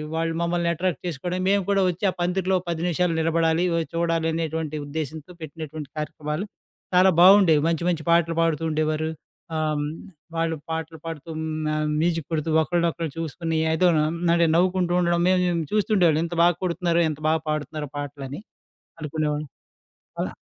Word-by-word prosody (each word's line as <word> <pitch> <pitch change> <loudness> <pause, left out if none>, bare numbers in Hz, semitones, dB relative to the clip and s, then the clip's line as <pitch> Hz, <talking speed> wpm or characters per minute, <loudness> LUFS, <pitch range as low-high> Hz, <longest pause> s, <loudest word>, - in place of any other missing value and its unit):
వాళ్ళు 165 0 0
మమ్మల్ని 170 0 0
అట్రాక్ట్ 175 +1 -1
చేసుకోవడం 175 +3 -3
మేము 200 0 +3
కూడా 195 -1 +3
వచ్చి 180 +2 -3
ఆ - - 0
పందిరిలో 185 +1 +1
10 165 -1 -2
నిమిషాలు 175 0 +1
నిలబడాలి, 165 +1 +2
వొయ్ 165 -1 0
చూడాలి 165 -1 0
అనేటువంటి 160 -1 -2
ఉద్దేశ్యంతో 155 +3 -5
పెట్టినటువంటి 155 -1 -7
కార్యక్రమాలు 150 +3 -3 0.5
చాలా 185 +1 +6
బావుండేవి. 185 -5 +7
మంచి, 165 0 0
మంచి 160 -3 -1
పాటలు 170 -1 +3
పాడుతూ 165 -1 +1
ఉండేవారు. 155 0 0 0.5
ఆహ్, 155 - 0 0.2
హ్మ్, 145 - -2 0.5
వాళ్ళు 165 0 0 0.2
పాటలు 160 0 -4
పాడుతూ, 165 0 -7
హ్మ్, 160 0 -3 0.3
ఆహ్, 155 0 0
మ్యూజిక్ 165 -3 0
కొడుతూ, 155 +1 -1
ఒకరినొకరు 170 -1 -1
చూసుకొని 165 0 -3
ఏదోను 160 -2 +3 0.3
అంటే, 170 -1 +4
నవ్వుకుంటూ 180 -1 +2
ఉండడం 170 -1 +2
మేము, 185 -1 +3
మేము 170 -2 0
చూస్తూ 215 +1 +1
ఉండేవాళ్ళం. 165 -3 +4
ఎంత 170 0 -5
బాగా 175 -1 +4
కొడుతున్నారో, 170 -1 +1
ఎంత 155 0 -6
బాగా 160 0 +1
పాడుతున్నారో 150 -1 -3
పాటలని 140 +3 -6 0.6
అనుకునేవాళ్ళం. 150 -1 -2 0.7
అలా - - -2
165 Hz, 155 wpm, -24 LUFS, 155-175 Hz, 0.7 s, బావుండేవి